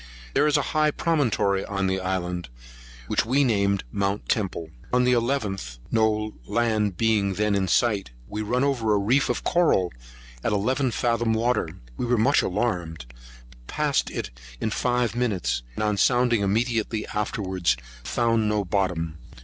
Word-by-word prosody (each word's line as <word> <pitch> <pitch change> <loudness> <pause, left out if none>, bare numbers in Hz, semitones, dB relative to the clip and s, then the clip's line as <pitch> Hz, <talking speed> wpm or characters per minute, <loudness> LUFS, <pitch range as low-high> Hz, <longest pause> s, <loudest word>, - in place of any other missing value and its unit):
There 145 +2 +3
is 150 - +3
a 145 - +1
high 155 -1 +3
promontory 120 -12 +1
on 100 -1 -2
this 95 0 0
island, 90 -3 -3 0.6
which - - +1
we 130 +6 +2
named 100 -5 +1
Mount 100 +1 -1
Temple. 90 -8 -1 0.2
On 125 0 +3
the 125 - +3
11th, 110 - -1
no 110 -1 +1
land 110 -5 +1
being 105 -4 +2
then 105 +1 +1
in 95 -1 +1
sight, 105 - +2 0.2
we 105 +1 -4
run 125 +5 0
over 120 -7 +1
a - - +3
reef 120 +8 +2
of 125 - -1
coral, 155 - +2 0.5
in - - 0
eleven 130 +6 +1
fathom 115 -1 +1
water. 115 -6 +1 0.3
We 125 - -2
were 120 0 +2
much 130 +7 +4
alarmed, 90 - -2 0.5
but - - -21
passed - - 0
it - - -5 0.3
in 110 - -1
five 120 0 0
minutes; 95 - 0
and - - -2
on 105 -1 +1
sounding 120 -1 +3
immediately 110 +1 0
afterwards, 95 - -1 0.3
found 115 - +1
no 105 -1 0
bottom. 85 -4 -1
105 Hz, 155 wpm, -25 LUFS, 95-120 Hz, 0.6 s, much